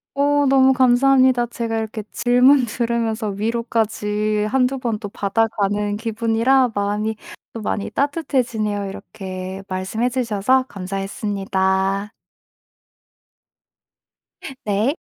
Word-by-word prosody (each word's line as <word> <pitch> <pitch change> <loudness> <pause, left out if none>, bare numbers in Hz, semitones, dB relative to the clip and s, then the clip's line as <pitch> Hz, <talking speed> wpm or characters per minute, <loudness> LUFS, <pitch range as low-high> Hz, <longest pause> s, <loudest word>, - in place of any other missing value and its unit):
어 285 0 +2
너무 265 0 +5
감사합니다. 255 0 +4
제가 230 -1 -3
이렇게 220 0 -4
질문 250 +3 +4
들으면서 230 -1 -1
위로까지 215 -1 -1
1-2 265 +2 +1
번 235 -4 -2
또 205 - -6
받아가는 205 0 0
기분이라 230 +3 +1
마음이 205 +2 -1 0.4
또 225 - -6
많이 205 -1 -2
따뜻해지네요. 240 -7 -1
이렇게 190 -1 -7
말씀해 190 +6 -1
주셔서 250 +1 +1
감사했습니다. 195 0 -2 2.5
네. 215 - +1
220 Hz, 240 characters per minute, -21 LUFS, 205-250 Hz, 2.5 s, 너무